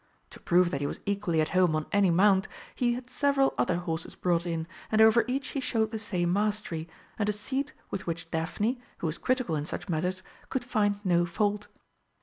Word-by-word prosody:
To - - -12
prove 175 0 +3
that 140 - -2
he 145 - 0
was - - -5
equally 200 -5 +1
at 155 - 0
home 180 -4 +3
on 155 0 -1
any 200 -2 +4
mount, 190 +3 +4 0.3
he 240 -1 +1
had 250 0 -7
several 275 0 +2
other 175 - +1
horses 165 -2 -4
brought 175 -1 0
in, 165 -1 -2 0.3
and 220 - +3
over 220 +1 +7
each 270 +3 -2
he 280 - -2
showed 220 -4 0
the 220 - -3
same 180 -5 0
mastery, 205 -5 -1 0.3
and 210 0 +1
a - - +2
seat 265 +8 -3 0.2
with 190 -2 -4
which 165 0 -4
Daphne, 205 +10 -1 0.2
who - - -5
was 155 0 -2
critical 255 -10 0
in 150 -1 -2
such - - -5
matters, 180 +3 -1 0.3
could 260 -2 -2
find 205 -4 +1
no 175 -1 +3
fault. 210 +3 0
195 Hz, 205 wpm, -28 LUFS, 170-220 Hz, 0.3 s, over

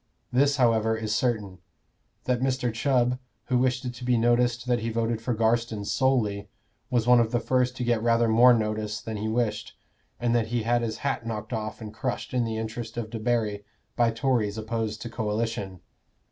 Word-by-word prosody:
This, 140 +3 +3
however, 110 -4 +2
is 110 -1 -2
certain 105 -6 -1 0.6
that 125 -1 0
Mr. 130 -3 0
Chubb, 125 +1 +1 0.3
who 125 -1 +3
wished 125 0 0
it 125 - -3
to 120 - -10
be 125 -1 +2
noticed 120 +1 +2
that 125 -1 +1
he 115 +1 -2
voted 115 0 -1
for 120 0 -1
Garstin 115 -1 0
solely, 110 -5 +1 0.4
was 120 -3 +1
one 125 0 +6
of 115 -1 +2
the 120 - +1
first 125 0 +1
to 125 - -2
get 120 -2 +1
rather 115 0 +3
more 120 +3 +7
notice 105 -2 0
than 110 +1 -5
he 105 +2 -3
wished, 110 -2 -1 0.4
and 120 -1 +1
that 115 -2 +2
he 120 0 -1
had 120 +1 +2
his 110 -2 -3
hat 135 -4 -1
knocked 110 +1 -4
off 110 0 -4
and 105 -1 -7
crushed 125 +2 -4
in 125 -2 +1
the 110 -1 -3
interest 115 +1 -5
of 110 -2 -4
Debarry 110 -3 -1 0.3
by 120 -1 +3
Tories 115 -3 0
opposed 110 0 -3
to 120 - -5
coalition. 105 -4 -3
115 Hz, 190 wpm, -26 LUFS, 110-125 Hz, 0.6 s, more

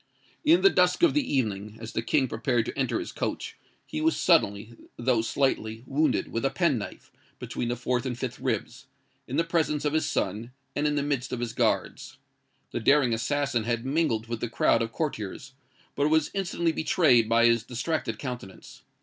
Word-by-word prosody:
In 325 +3 +5
the 390 - +6
dusk 180 - +2
of 340 - +6
the 290 -3 0
evening, 110 -5 -1
as 115 0 -7
the - - 0
King 130 +3 +1
prepared 120 0 0
to - - -5
enter 135 -2 0
his 345 - -5
coach, - - -4 0.3
he 310 - -4
was 320 +1 +2
suddenly, 110 - +2 0.2
though 120 -1 +2
slightly, 115 -2 -1
wounded, 145 +2 +1
with 115 - -2
a 135 - +3
pen 160 -8 +1
knife, 105 - -9 0.3
between 120 - -4
the 120 - -1
fourth 125 0 -1
and 125 -3 -3
fifth 130 -1 -5
ribs, - - -3 0.4
in 135 - -3
the 165 - +3
presence 155 -3 0
of 150 - +1
his 155 - +1
son, 110 +5 -2 0.2
and 145 +1 +1
in 150 - 0
the 145 - 0
midst 140 -3 -2
of 125 - -3
his 120 -1 -3
guards. - - -1 0.5
The - - -2
daring 130 +1 +4
assassin 120 0 0
had 120 0 -1
mingled 135 -6 0
with 115 -1 -4
the 120 - -3
crowd 120 - +2
of 115 0 -2
courtiers, 130 -2 -4 0.4
but 145 +1 +2
was 160 -1 +2
instantly 175 -4 0
betrayed 140 -8 +3
by 115 +1 +4
his 115 -1 +4
distracted 125 -2 -3
countenance. 125 -7 -8
130 Hz, 190 wpm, -27 LUFS, 115-150 Hz, 0.5 s, the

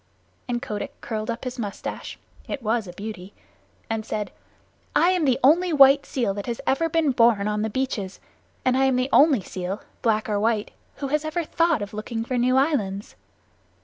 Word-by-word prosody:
And 240 0 -2
Kotick 210 -6 -5
curled 215 -1 -4
up 235 0 -3
his 255 -1 -5
mustache 205 -3 -5 0.3
(it 270 - -5
was 220 -1 0
a 175 - -8
beauty) 200 -1 -8 0.5
and 225 -1 -2
said, 210 -1 -4 0.6
"I 345 - +5
am 360 -4 +1
the 260 -2 +2
only 340 +6 +5
white 275 -1 +6
seal 235 -7 -1
that 200 0 -6
has 235 0 -3
ever 330 +5 +1
been 320 -3 +2
born 230 -4 +3
on 210 0 -1
the 220 - -1
beaches, 210 -6 -3 0.5
and 255 0 +3
I 265 +1 +3
am 265 -1 +3
the 255 +1 0
only 285 -7 +6
seal, 185 +2 -5 0.2
black 220 -2 +1
or 210 -2 0
white, 220 -1 0 0.2
who 275 -1 -5
ever 310 +3 0
thought 330 -6 +1
of 205 +1 -8
looking 225 +2 -4
for 255 - -2
new 250 +2 +3
islands." 215 -9 0
240 Hz, 185 wpm, -24 LUFS, 210-275 Hz, 0.6 s, white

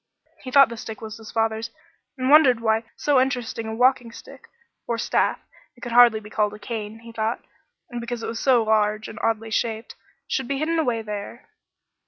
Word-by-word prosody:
He 260 - -7
thought 275 0 +6
the 235 - -7
stick 220 0 -7
was 220 -1 -8
his 225 -1 -11
father's 225 0 -1 0.5
and 260 +1 0
wondered 275 -6 +6
why 225 0 +1
so 285 -3 +3
interesting 245 -3 -2
a 220 - -4
walking 250 -1 +2
stick - - -13 0.4
or 235 - -1
staff; - - +1 0.4
it 240 - -21
could 240 - -6
hardly 235 -2 +6
be 210 0 -13
called 210 -1 0
a - - -10
cane, 220 0 -6
he 230 0 -11
thought, 225 +1 -3 0.5
because 235 0 -5
it - - -3
was 225 0 -4
so 250 -4 +3
large 215 0 +1
and 220 - -9
oddly 225 0 -1
shaped 225 0 -2 0.3
should 265 -3 -2
be 275 - -2
hidden 325 +3 0
away 240 -7 0
there. 210 +2 -7
230 Hz, 195 wpm, -23 LUFS, 220-245 Hz, 0.5 s, thought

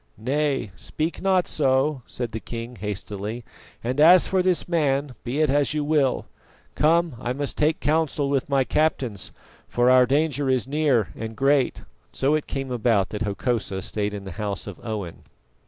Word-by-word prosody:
"Nay, 135 0 -1
speak 155 - -4
not 190 -2 +2
so," 135 0 +1
said 120 -2 -4
the 110 - -4
king 115 +2 -7
hastily; 105 +3 -5 0.4
"and 125 +4 -2
as 175 +3 +8
for 190 -1 +1
this 180 -1 +1
man, 145 -5 +1
be 130 +5 -1
it 155 - +3
as 145 +1 +1
you 150 - 0
will. 145 -3 +1 0.5
Come, 165 -2 +2
I 125 - -1
must 140 +1 -3
take 155 +1 +1
counsel 150 -2 +1
with 140 0 -1
my 135 -1 +3
captains, 130 - 0 0.4
for 120 +1 +3
our 130 -1 +6
danger 145 0 +1
is 130 -1 +1
near 135 - +2
and 110 0 -6
great." 135 -1 +2 0.3
So 135 +3 +1
it 155 -1 0
came 135 -2 -4
about 115 -5 +2
that 105 - -5
Hokosa 105 -2 -2
stayed 105 -1 -2
in 100 - -6
the 95 - -7
house 100 -2 -3
of 100 -4 -8
Owen. 105 -7 -5
135 Hz, 170 wpm, -24 LUFS, 115-150 Hz, 0.5 s, as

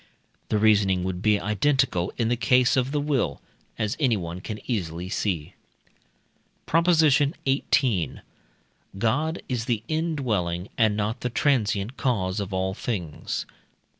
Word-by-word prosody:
The 110 - +2
reasoning 100 -4 +3
would 90 -1 -3
be 105 -1 +3
identical 105 -3 +1
in 115 - +1
the 120 - +2
case 125 +2 +3
of 130 -1 +1
the 150 - 0
will, 145 -3 0 0.4
as 105 -2 -1
anyone 95 - 0
can 105 +2 -6
easily 90 -6 -3
see. 90 -7 -2 1.1
PROP. 165 +2 +2
XVIII. 140 - +2 0.8
God 150 - 0
is 120 -3 -2
the 115 -4 -1
indwelling 120 - -1
and 110 -3 +2
not 105 +1 -1
the 125 - -1
transient 115 -3 0
cause 100 -7 0
of 100 -1 -4
all 95 0 -1
things. 95 -8 -4
110 Hz, 130 wpm, -25 LUFS, 95-135 Hz, 1.1 s, reasoning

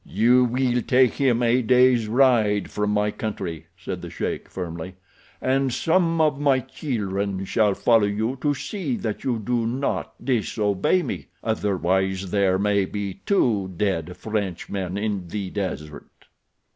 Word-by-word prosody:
"You 120 +5 +3
will 125 0 +1
take 125 -1 +3
him 125 -3 +1
a 120 +2 +3
day's 125 -1 +4
ride 110 -4 +3
from 105 0 -1
my 105 0 +1
country," 85 -7 -5
said - - -6
the - - -7
sheik, - - -4
firmly, 90 0 -6 0.4
"and 135 0 +1
some 165 +4 +1
of 150 -3 +2
my 140 -3 +4
children 100 -8 -3
shall 105 0 +2
follow 115 -3 +3
you 110 +5 -1
to 145 -1 +1
see 150 - -3
that 110 -3 -4
you 125 -3 0
do 115 +1 -1
not 130 +4 -2
disobey 110 - +1
me—otherwise 95 - -2
there 100 -2 +2
may 100 0 +2
be 100 -1 -5
two 110 - +2
dead 90 -4 -1
Frenchmen 95 -2 -3
in 100 -4 -2
the 95 +1 -4
desert." 75 -7 -6
105 Hz, 140 wpm, -24 LUFS, 95-125 Hz, 0.4 s, day's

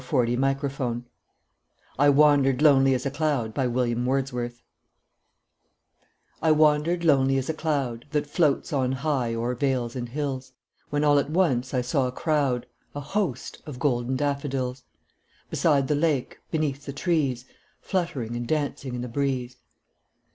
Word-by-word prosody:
William 120 -3 +2
Wordsworth 135 -3 -1 1.0
I 145 +1 +6
Wandered 145 -2 +4
Lonely 135 -3 +5
As 125 - -3
a 140 - 0
Cloud 140 -7 -1
I 130 - +2 2.8
WANDERED 155 +3 +3
lonely 135 -4 +4
as 135 +2 -2
a - - -5
cloud 140 -7 -2
That 150 -2 0
floats 150 +1 +1
on 130 -2 +1
high 130 -4 -1
o'er 120 +2 -1
vales 125 -2 -1
and 120 -2 -4
hills, 130 -1 -4 0.4
When 145 0 0
all 145 -1 +5
at 140 - -2
once 135 -7 +1
I 125 - +2
saw 130 +1 0
a - - -3
crowd, 140 -4 0 0.3
A - - -3
host, 175 - -3
of 145 -4 -7
golden 125 -2 0
daffodils; 135 -2 -2 0.7
Beside 140 -4 +2
the 150 - +1
lake, 145 -3 0
beneath 145 -3 -2
the 140 - -4
trees, 140 -6 0 0.3
Fluttering 140 - -2
and 120 0 -4
dancing 140 -4 -2
in 120 - -4
the 125 - -4
breeze. 125 -1 -2
135 Hz, 140 wpm, -25 LUFS, 125-150 Hz, 2.8 s, I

